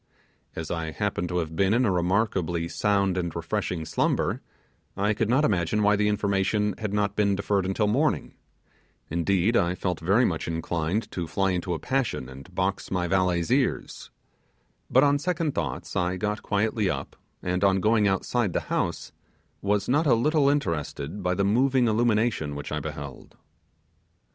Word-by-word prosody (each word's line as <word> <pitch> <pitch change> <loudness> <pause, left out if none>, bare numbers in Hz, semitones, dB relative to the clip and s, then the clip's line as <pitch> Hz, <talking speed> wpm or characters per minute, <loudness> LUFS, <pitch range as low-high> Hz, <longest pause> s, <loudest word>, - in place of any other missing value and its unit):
As 80 -1 -5
I 80 -2 -2
happened 90 -1 -2
to 90 - -1
have 80 -2 -2
been 95 +4 +3
in 125 +1 +3
a 100 - +2
remarkably 90 -2 0
sound 100 -1 +1
and 85 -2 -3
refreshing 85 -1 -2
slumber, - - 0 0.6
I 105 +2 +2
could 110 +1 -1
not 135 +5 +3
imagine 100 - +1
why 105 0 +4
the 105 +1 +1
information 105 0 +1
had 110 -2 -3
not 100 -1 0
been 100 -2 +2
deferred 100 -1 0
until 95 +3 +1
morning, 135 +9 +1 0.8
indeed, 95 +6 +1
I 85 -2 +2
felt 90 -2 -2
very 100 +9 +3
much 80 -6 -2
inclined 85 +4 -2
to 85 -3 -4
fly 95 +4 0
into 90 0 -1
a - - -5
passion 125 - -1
and 70 +8 -12
box 95 +1 -1
my 90 -2 -1
valet's 90 0 +1
ears; 130 0 0 0.8
but 130 - +5
on 145 0 +3
second 165 -2 -1
thoughts - - -4
I 90 +1 0
got 105 +2 -2
quietly 105 0 0
up, - - -4 0.3
and 90 +1 -1
on 95 -1 +4
going 105 +1 +3
outside 100 +1 0
the - - 0
house - - -1 0.5
was 100 0 0
not 150 +5 +2
a 125 - +5
little 145 +4 +3
interested 85 - -2
by 90 0 0
the 100 - +1
moving 125 +4 +3
illumination 110 -8 +1
which 75 0 -6
I 75 - -1
beheld. 70 -2 -8
100 Hz, 170 wpm, -26 LUFS, 85-110 Hz, 0.8 s, but